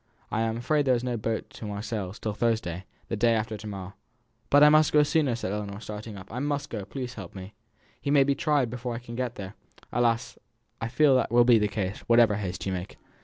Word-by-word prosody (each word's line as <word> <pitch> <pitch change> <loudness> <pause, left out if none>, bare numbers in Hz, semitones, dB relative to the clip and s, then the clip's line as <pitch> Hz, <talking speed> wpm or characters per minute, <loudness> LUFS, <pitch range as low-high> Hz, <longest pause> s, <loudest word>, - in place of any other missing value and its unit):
I 110 - 0
am 115 0 0
afraid 145 +4 +1
there 130 -2 +4
is 120 - -2
no 125 -1 -1
boat 110 0 -3
to - - -9
Marseilles 105 -1 -4
till 110 - -3
Thursday, 105 -6 -1 0.2
the - - -1
day 115 +1 +3
after 110 0 -2
to 105 +1 -8
morrow." 95 -2 -7 0.6
"But 145 +1 +6
I 150 - +9
must 155 0 +5
go 150 0 +6
sooner!" 145 -5 +1
said 105 -5 -3
Ellinor, 100 -1 -4
starting 105 -1 -7
up. 95 +1 -10
"I 125 - -3
must 145 +1 -2
go; 105 -4 -4
please 125 0 -5
help 95 -6 -9
me. 95 +1 -8 0.5
He - - -3
may 140 -1 +6
be 140 +1 +2
tried 140 -5 +1
before 125 -1 -4
I - - -3
can 120 -1 -9
get 125 -1 -2
there!" 95 -2 -7 0.4
"Alas! 120 0 0 0.4
I 115 - -1
fear 135 +4 +4
that 130 - +2
will 120 0 +5
be 120 -2 +6
the 105 - +2
case, 100 -1 -3
whatever 115 -3 +5
haste 95 -3 -4
you 95 - -1
make. 90 +1 -6
115 Hz, 235 wpm, -27 LUFS, 105-125 Hz, 0.6 s, I